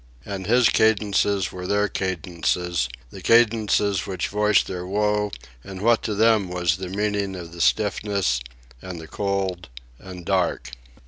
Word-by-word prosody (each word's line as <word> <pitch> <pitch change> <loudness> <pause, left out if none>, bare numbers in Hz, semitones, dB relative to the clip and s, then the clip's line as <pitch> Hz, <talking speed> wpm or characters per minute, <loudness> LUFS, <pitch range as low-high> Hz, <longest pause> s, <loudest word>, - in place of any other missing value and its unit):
And 95 -2 -5
his 120 +1 +5
cadences 100 -3 +2
were 90 0 -6
their 105 +1 +2
cadences, 90 -5 -2 0.2
the - - -10
cadences 105 -4 +3
which 95 -2 -3
voiced 105 0 +3
their 90 -1 -5
woe 105 +1 +1 0.3
and 95 -1 -8
what 115 +3 +3
to 105 - -3
them 110 -3 +3
was 90 -2 0
the 95 -1 -6
meaning 100 0 -1
of 85 -2 -8
the 85 0 -7
stiffness, 100 - +1 0.4
and 90 -2 -7
the 80 - -10
cold, 95 -4 -2 0.3
and 90 -2 -10
dark. 90 -10 0
100 Hz, 145 wpm, -23 LUFS, 90-105 Hz, 0.4 s, his